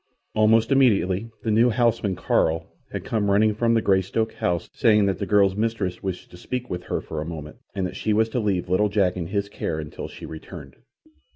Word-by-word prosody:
Almost 110 +2 +3
immediately 115 -6 +3
the 110 - 0
new 115 +3 +5
houseman, 115 -5 +1
Carl, 80 -1 +1 0.3
had - - -5
come 105 -3 0
running 105 +2 +4
from 115 +2 +2
the 115 - +2
Greystoke 100 +3 +1
house, 85 -1 -1
saying 105 -5 +4
that 100 -1 0
the 100 - -3
girl's 100 -2 +4
mistress 105 -5 -2
wished 95 -2 -5
to 90 - -12
speak 125 +6 -5
with 90 0 -4
her - - -2
for 80 -1 -5
a - - -4
moment, 75 -2 -8 0.2
and 95 -2 -1
that 90 - -5
she 110 - -1
was 110 +1 +3
to 125 - -1
leave 100 -5 0
little 95 +4 +2
Jack 100 -3 +1
in 85 -3 -4
his 100 +2 -1
care 80 -5 -4
until 75 -2 -6
she - - -10
returned. 80 -3 -10
100 Hz, 210 wpm, -24 LUFS, 90-110 Hz, 0.3 s, new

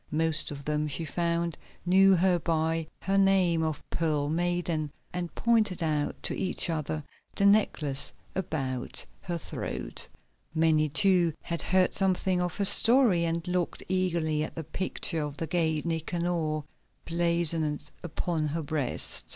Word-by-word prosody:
Most 160 0 +1
of 140 -1 -8
them, 150 0 0
she 150 +3 -3
found, 170 0 -1 0.3
knew 190 +2 +6
her 180 0 +3
by 160 0 0 0.2
her 195 +1 +2
name 190 -4 +3
of 155 -2 -3
Pearl 150 -3 0
Maiden, 170 -2 -1 0.2
and 175 -2 -4
pointed 215 -7 +1
out 150 -2 -1
to - - -2
each 185 -1 0
other 155 -1 -3 0.3
the 200 - +1
necklace 165 -9 +2 0.2
about 135 -9 -3 0.2
her 175 -1 -3
throat. 60 - -5 0.5
Many, 160 -1 +3
too, 175 -1 +4
had 170 -1 -3
heard 185 0 +2
something 185 -1 +1
of 175 -2 -2
her 200 - +1
story, 225 -6 +6
and 165 +1 -2
looked 180 -1 -2
eagerly 170 -5 0
at - - -6
the 165 - -4
picture 165 0 -1
of 145 -1 -5
the 165 - -2
gate 160 -2 0
Nicanor 165 -1 -1 0.4
blazoned 165 -3 0
upon 165 -1 -2
her 160 +2 -3
breast. 145 -4 0
165 Hz, 145 wpm, -28 LUFS, 155-180 Hz, 0.5 s, knew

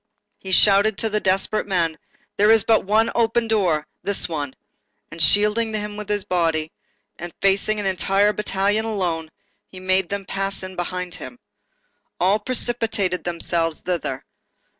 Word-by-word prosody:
He 190 - -9
shouted 200 +2 +5
to 225 -2 -2
the 210 - +1
desperate 195 +2 0
men:—"There 180 +3 -1
is 225 -2 +6
but 220 -3 +2
one 215 +3 +3
door 230 - -4 0.6
open; 150 - -5 0.2
this 200 -1 +1
one."—And 145 -4 -8
shielding 210 +7 +3
them 210 -1 -3
with 210 -1 -7
his 205 -1 0
body, 165 -4 0 0.5
and 175 +1 -6
facing 200 +2 +1
an 205 - -3
entire 195 +2 +2
battalion 205 +1 0
alone, 175 -7 -2 0.4
he 185 - -12
made 185 -1 +1
them 200 -1 -4
pass 195 0 -3
in 185 0 -7
behind 180 0 -4
him. 180 +7 -8 0.8
All 195 +4 +3
precipitated 225 -6 0
themselves 170 -1 -1
thither. 165 -7 -3
195 Hz, 140 wpm, -22 LUFS, 175-210 Hz, 0.8 s, is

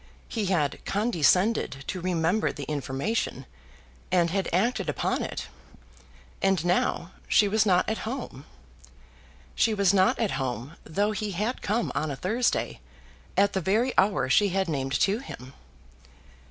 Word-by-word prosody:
He 215 -4 -2
had 155 -7 0
condescended 190 - +1
to 185 - -4
remember 180 +3 +1
the 145 - -7
information, 145 - -2 0.7
and 175 -2 +3
had 195 +1 -1
acted 220 +9 +1
upon - - -1
it, - - -4 1.0
and 190 -4 +2
now 175 0 0 0.2
she 205 - +4
was 215 +1 +2
not 180 -2 +3
at 220 - -1
home! 225 - -6 1.1
She 220 - +2
was 200 -2 +3
not 200 +7 +4
at 225 -4 0
home, 130 +4 -4
though 205 +6 0
he 210 -1 -3
had 215 +8 -2
come 225 +4 0
on 155 - -1
a 140 - -3
Thursday 225 - 0 0.6
at 200 0 +4
the 190 - 0
very 220 +9 +1
hour 195 -6 +3
she 200 +10 +4
had 190 0 0
named 135 -3 -1
to 200 +3 +2
him. 130 - -10
190 Hz, 145 wpm, -27 LUFS, 160-215 Hz, 1.1 s, she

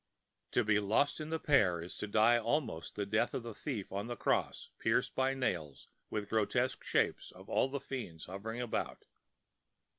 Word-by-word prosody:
To 120 - +4
be 105 -1 +3
lost 110 +10 +2
in 155 - -5
the 160 - 0
pear 100 - +3
is 85 +2 -7
to 105 - -3
die 110 +3 +5
almost 115 - -1
the 105 - -1
death 110 +4 +1
of 125 - -2
the 115 -1 -6
thief 110 -5 -4
on 100 +3 -3
the 120 - -3
cross, - - 0
pierced - - +1
by 130 +1 +1
nails 80 - -2
and - - -46
with 105 -1 -2
grotesque 120 +4 +1
shapes - - +1
of - - -14
all - - +2
the 140 +1 -3
fiends 125 -12 -6
hovering 110 +6 -5
about. 120 - -3
110 Hz, 185 wpm, -34 LUFS, 100-130 Hz, -, die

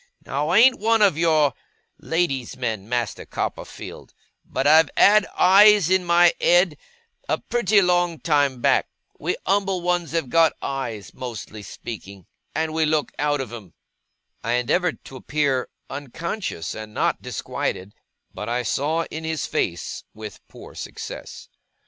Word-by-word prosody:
Now, 145 +3 -2
I 180 - +4
ain't 250 +3 +6
one 225 0 +3
of 195 -7 +4
your 155 -4 +3 0.5
lady's 150 -7 -1
men, 110 -5 -3
Master 120 -4 -2
Copperfield; - - -6 0.3
but 130 - -3
I've 155 +1 +6
had 210 0 +6
eyes 200 -1 +6
in 190 -1 +3
my 175 0 +5
ed, 175 -3 +3 0.5
a - - +2
pretty 215 -4 +2
long 175 -2 +1
time 140 -5 +1
back. - - +3 0.3
We - - -2
umble 195 -1 +1
ones 175 -2 -1
have 160 -7 -1
got 165 -1 +4
eyes, 115 -7 -5
mostly 110 -4 -7
speaking 100 -3 -9 0.3
and 160 0 -1
we 160 0 +1
look 155 -1 0
out 145 -1 +1
of 120 -3 -7
'em.' 100 -8 -10 0.7
I 115 - 0
endeavoured 145 +9 0
to 135 - -10
appear 140 -2 -1 0.2
unconscious 145 - -5
and 110 -1 -9
not - - 0
disquieted, 95 +3 -4 0.4
but, - - -6
I 120 +1 -1
saw 150 +8 0
in 160 +1 -6
his 160 -3 -2
face, 85 -1 -3
with 110 -1 -9
poor - - -13
success. - - -8
150 Hz, 145 wpm, -23 LUFS, 125-175 Hz, 0.7 s, ain't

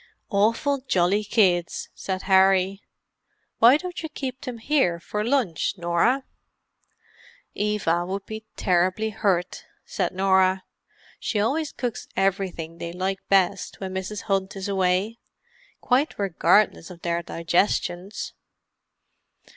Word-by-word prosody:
"Awful 230 +8 +2
jolly 190 0 +2
kids," 185 -5 +1
said 190 -1 -4
Harry. 190 0 +4 0.8
"Why 240 +5 +7
don't 360 +2 -6
you 320 - -5
keep 265 -4 -5
them 250 -4 -6
here 225 - +1
for 210 +5 -3
lunch, 230 - 0
Norah?" 175 +10 +1 1.3
"Eva 205 -5 0
would 195 +1 -4
be 220 0 -7
terribly 185 +4 +1
hurt," 195 -4 -1 0.2
said - - -2
Norah. 190 0 +3 0.6
"She 215 - -1
always 285 +9 0
cooks 245 -4 -4
everything 185 -4 -1
they 170 - -5
like 190 +2 -2
best 195 0 +2
when 190 -1 -5
Mrs. 190 +2 -4
Hunt 195 -1 -1
is 195 0 -4
away—quite 230 - -2
regardless 195 -1 +2
of 175 -2 -12
their 170 0 0
digestions." 175 +3 -1
195 Hz, 115 wpm, -24 LUFS, 180-220 Hz, 1.3 s, Why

